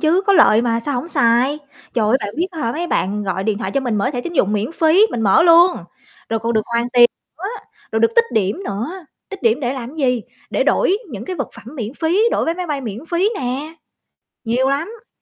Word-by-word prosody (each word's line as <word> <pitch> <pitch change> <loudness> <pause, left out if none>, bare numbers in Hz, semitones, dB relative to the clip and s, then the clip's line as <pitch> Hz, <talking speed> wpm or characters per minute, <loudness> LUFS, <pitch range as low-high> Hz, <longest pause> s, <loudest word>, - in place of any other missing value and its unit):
chứ, 335 +4 +3
có 400 - +5
lợi 235 - +5
mà, 230 -1 0
sao 285 +4 -3
hổng 250 +7 -3
xài. 245 +1 +2 0.4
Trời 225 -4 +1
ơi, 230 - +4
bạn 205 - -5
biết 350 +3 0
á 335 - -9
hả, 230 -2 -1
mấy 345 +3 -3
bạn 205 - -1
gọi 190 0 -2
điện 210 -1 0
thoại 230 - -3
cho 275 - +2
mình 240 -5 -1
mở 255 +6 0
thẻ 245 -4 -3
tín 345 - -6
dụng 205 - +2
miễn 215 +9 -1
phí, 335 +6 +4
mình 235 - -3
mở 205 +10 +5
luôn, 345 +1 +6 0.5
rồi 225 0 -1
còn 230 +1 -1
được 220 - +1
hoàn 235 +1 +1
tiền 240 -1 +7 0.3
nữa, 370 - -8 0.5
rồi 220 - +1
được 230 - +5
tích 465 - +6
điểm 215 - 0
nữa, 210 - -3 0.4
tích 395 - -9
điểm 230 +3 +2
để 250 -2 -1
làm 260 +3 -7
gì, 250 -5 +1 0.3
để - - +1
đổi 385 - +2
những 215 -3 -7
cái 365 +7 -5
vật - - -3
phẩm 230 - -13
miễn 230 0 -5
phí, 330 +6 +1
đổi - - 0
vé 330 - 0
máy 360 0 -4
bay 290 -3 -2
miễn 230 +3 -7
phí 350 +4 +1
nè, 270 +5 -4 0.7
nhiều 250 +3 +1
lắm! 415 - -3
255 Hz, 245 wpm, -19 LUFS, 225-330 Hz, 0.7 s, tiền